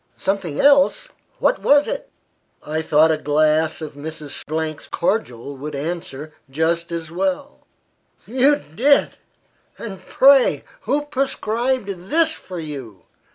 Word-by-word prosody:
"Something 190 -6 -2
else! 280 - +4 0.3
What - - +1
was 290 0 +4
it?" - - -4 0.6
"I 155 +1 -2
thought 160 0 +4
a 155 - 0
glass 155 +2 +1
of 150 - -7
Mrs. 150 0 -6
's 155 -1 -3
cordial 140 - -2
would 150 +2 -6
answer 155 -1 -5 0.2
just 165 +4 -1
as 165 -1 -5
well." 280 - -3 0.6
"You 265 +5 +3
did! 275 - +1 0.6
and, 195 -4 -8
pray, 270 -1 +5 0.3
who 290 +1 +1
prescribed 240 -7 -2
this 325 0 +3
for 185 - -9
you?" 135 - -8
170 Hz, 120 wpm, -21 LUFS, -, 0.6 s, pray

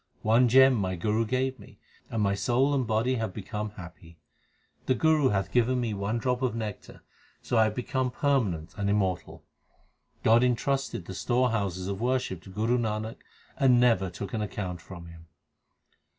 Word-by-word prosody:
One 115 +3 +4
gem 130 +2 +7
my 95 -5 -1
Guru 105 +6 0
gave 130 +2 -1
me, - - -15 0.3
and 110 -2 -1
my 100 -1 +2
soul 120 +8 +1
and 130 -4 0
body 115 +4 +1
have 110 -5 -3
become 105 +1 -4
happy. 85 -3 -12 0.7
The 130 - +3
Guru 155 -3 +3
hath 95 -2 -1
given 125 +1 +2
me 115 -3 -1
one 100 +3 -2
drop 125 +1 -1
of 125 -3 0
nectar, 110 -3 -7 0.4
so 120 - +1
I 110 - +6
have 110 -1 -2
become 130 +1 -1
permanent 115 - -1
and 100 -1 0
immortal. 95 -3 -1 0.8
God 115 +2 +5
entrusted 125 -5 -1
the 95 - -7
storehouses 105 -5 0
of 100 +1 -4
worship 125 -8 -1
to - - -11
Guru 110 +5 0
Nanak, 110 0 -3 0.4
and 125 -3 +5
never 115 -7 +3
took 100 +1 -7
an 110 - -1
account 95 -4 -4
from 85 -1 -10
him. 85 0 -13
110 Hz, 170 wpm, -28 LUFS, 100-125 Hz, 0.8 s, gem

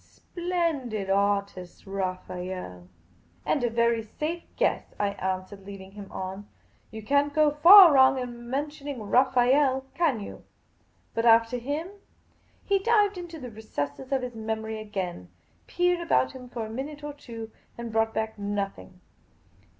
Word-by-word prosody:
Splendid 315 - -3
artist, 200 -2 -1
Raphael! 185 - -5
" 85 0 -34
" 85 +2 -35
And 280 - +1
a 240 - +2
very 235 0 +2
safe 305 +10 -4
guess," - - -1
I 205 - +1
answered, 190 0 -4
leading 195 -1 -9
him 200 -1 -11
on. 190 +2 -6 0.2
" - - -37
You 220 0 -9
can't 285 +4 +1
go 305 -1 +4
far 345 +3 +9
wrong 265 0 +6
in 240 -2 -6
mentioning 285 -2 -4
Raphael, 260 +3 +3
can 315 -9 +1
you? 200 - -9 0.7
But 230 - -1
after 230 +1 +5
him? 290 +8 -3 0.4
" - - -37
He 395 -1 +2
dived 415 -2 +2
into 340 -2 -8
the 250 -3 -8
recesses 215 - -5
of 265 -2 +1
his 250 -1 -5
memory 220 0 -4
again, 190 - -5 0.4
peered 355 0 +1
about 335 -6 +1
him 255 -2 -11
for 235 -2 -4
a - - -8
minute 290 +5 -6
or 295 0 -5
two, 230 -5 -9 0.3
and 235 -1 -6
brought 225 0 +1
back 220 -1 -3
nothing. 200 - -4
230 Hz, 155 wpm, -27 LUFS, 200-285 Hz, 0.7 s, far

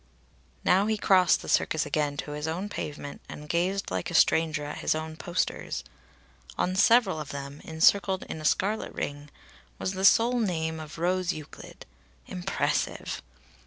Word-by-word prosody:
Now 195 +3 +4
he 220 0 +1
crossed 185 -3 +4
the - - -9
Circus 160 - +2
again 145 0 -1
to 145 - -7
his 150 +1 -4
own 180 +6 -3
pavement 145 -5 -6
and 150 - -8
gazed 180 +5 0
like - - -2
a 175 - -4
stranger 160 -2 +3
at 145 - -6
his - - +1
own 160 0 -5
posters. 175 +2 -2 0.7
On 185 - 0
several 200 -4 +4
of 150 - -6
them, 140 +1 -7
encircled 185 +4 +3
in 160 - -7
a - - -7
scarlet 205 +7 +1
ring, 145 +1 -5 0.5
was 185 - -2
the 190 0 -4
sole 235 +5 +5
name 160 -6 -1
of 155 0 -9
Rose 180 +1 0
Euclid 155 -2 -11 0.4
impressive! 180 +1 -2
165 Hz, 160 wpm, -27 LUFS, 150-190 Hz, 0.7 s, sole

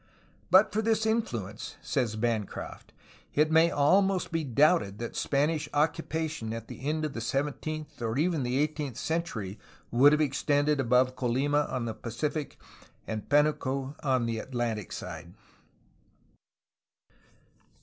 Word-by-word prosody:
"But 190 +4 +6
for 215 - +1
this 220 0 +1
influence/* 120 - -2
says 120 -6 -1
Bancroft, 110 -2 -3 0.4
"it 155 +2 +3
may 165 +1 +6
almost 185 +6 +2
be 165 -1 0
doubted 140 - +3
that 120 +1 -6
Spanish 150 +2 0
occupation 155 -4 -1
at 115 -1 -6
the 135 - -7
end 155 0 0
of 150 - -4
the 115 - -5
seventeenth 150 +3 -3
or 115 +1 -1
even 160 0 +1
the 125 +1 -1
eighteenth 150 -3 -1
century 115 - -3 0.3
would 135 +5 +6
have 150 - +3
extended 145 0 +1
above 130 0 +3
Colima 135 +4 +1
on 125 -2 -2
the 115 - -3
Pacific 145 +7 -4 0.5
and 110 -1 -5
Pdnuco 140 -2 +1
on 130 -4 +2
the 115 -1 -2
Atlantic 120 -4 -3
side." 85 0 -7
140 Hz, 130 wpm, -29 LUFS, 120-155 Hz, 0.5 s, But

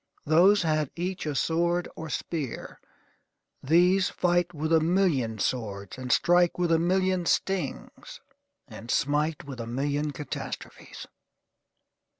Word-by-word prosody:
Those 180 +6 +5
had 155 -3 0
each 180 -1 -4
a 150 - -2
sword 170 +4 0
or 160 0 -7
spear; 150 -6 -5 0.8
these 180 +6 +3
fight 175 -1 +1
with 160 0 -2
a 160 - +6
million 160 - +1
swords, 100 -4 -3
and 130 -1 -5
strike 175 0 +3
with 175 -1 0
a 165 - +4
million 185 0 +1
stings, 195 - -2 0.5
and 115 -1 -11
smite 150 +3 0
with 135 -4 -9
a 115 - -5
million 145 +5 -1
catastrophes. 145 -1 -7
160 Hz, 125 wpm, -27 LUFS, 140-175 Hz, 0.8 s, a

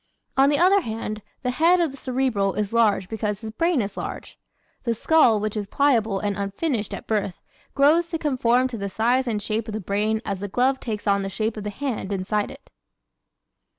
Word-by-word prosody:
On 270 +1 +5
the 290 - +2
other 380 +4 +5
hand, 220 -4 -5 0.2
the 250 - 0
head 335 +7 +4
of 335 -4 +1
the - - -10
Cerebral 250 -7 0
is 210 0 -2
large 215 -5 +3
because 210 -1 -3
his 220 -1 -6
brain 330 +2 +1
is 200 - -6
large. - - -7 0.4
The 235 -2 0
skull 240 -4 +4
which 215 +1 -3
is 205 -2 -3
pliable 225 -6 +2
and 205 -1 -1
unfinished 205 - -2
at - - -9
birth 205 -4 -1 0.4
grows 315 +5 +4
to 330 - -2
conform 255 -4 +2
to 235 -3 -6
the 200 0 -3
size 245 +6 +1
and 220 -3 0
shape 215 +2 -2
of 215 - -4
the - - -2
brain 210 +3 0
as 200 -2 -3
the 205 - -4
glove 255 +6 +1
takes 215 -3 -5
on 200 -1 +2
the 195 - -3
shape 215 +3 -2
of 210 -1 -6
the - - -1
hand 225 -3 -4
inside 205 +2 -1
it. - - -14
220 Hz, 210 wpm, -24 LUFS, 205-265 Hz, 0.4 s, On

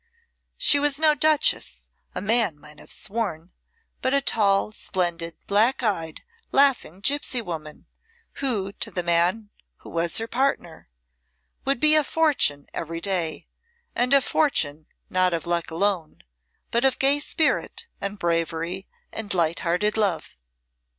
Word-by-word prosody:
She - - +4
was 290 -1 +2
no 310 0 +4
Duchess, 310 +1 +1 0.3
a 180 - -3
man 210 -7 +2
might 150 +1 -16
have - - -16
sworn, 195 -6 -3 0.5
but 260 +1 +1
a - - +4
tall, 210 -6 +2
splendid, 170 -5 -2
black 225 +6 +2
eyed 165 -8 -2 0.3
laughing 270 - +2
gipsy 275 +1 +1
woman, 160 -8 -7 0.6
who, 215 -8 -1
to - - -3
the 180 - -2
man 175 +5 +1 0.3
who - - -12
was 170 0 0
her 225 - -1
partner, 230 - -2 0.8
would 275 -1 0
be 305 +2 +6
a 310 -1 +6
fortune 275 - +1
every 165 0 -5
day, 175 -4 -1 0.5
and 245 +2 +1
a 275 - +5
fortune 160 - 0 0.2
not 185 -1 +2
of 165 - -5
luck 170 -1 -1
alone, 170 -1 -2 0.5
but 235 +2 +1
of 265 -1 +3
gay 275 +2 +4
spirit 315 +8 0 0.2
and 200 +1 -4
bravery 170 +1 -2 0.2
and 210 -3 -3
light 170 -1 +1
hearted 190 +5 0
love. 195 -8 -1
200 Hz, 140 wpm, -24 LUFS, 170-265 Hz, 0.8 s, be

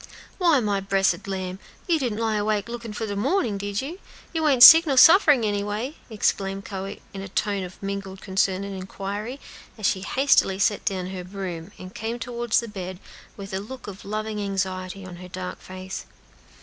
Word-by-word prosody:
"Why, 335 -6 +4
my 205 -4 0
bressed 195 0 +1
lamb, 185 -1 -4 0.3
you 335 -3 +3
didn't 240 -6 -2
lie 220 -1 0
awake 210 0 0
lookin' 235 -1 -6
for 210 +1 -4
de 205 -2 -4
mornin', 215 - 0
did 205 +3 -2
you? 330 +7 -6 0.3
You 320 -2 +1
ain't 260 -4 +6
sick, 325 +3 +11
nor 275 -2 +1
sufferin' 300 - +7
any 205 -1 0
way?" 215 +8 -3
exclaimed 195 -2 -1
Chloe, 195 0 -6
in 195 - -6
a 195 - -6
tone 200 +1 -1
of 180 0 -9
mingled 195 -1 -5
concern 190 0 0
and 200 0 -5
inquiry, 200 +6 -5 0.4
as 215 - -4
she 190 - +2
hastily 195 -2 +3
set 205 +1 +1
down 185 -1 -2
her 185 -1 -5
broom, 180 -2 -6
and 185 +1 -10
came 225 +2 -4
toward 235 -1 -5
the 235 - +3
bed, 185 -3 -6 0.4
with 195 -1 -8
a 190 - -1
look 245 +5 -9
of 200 -1 -9
loving 215 +1 -3
anxiety 190 -1 -3
on 180 -2 -9
her 180 +1 -10
dark 180 0 -6
face. 185 0 -7
200 Hz, 190 wpm, -24 LUFS, 190-230 Hz, 0.4 s, sick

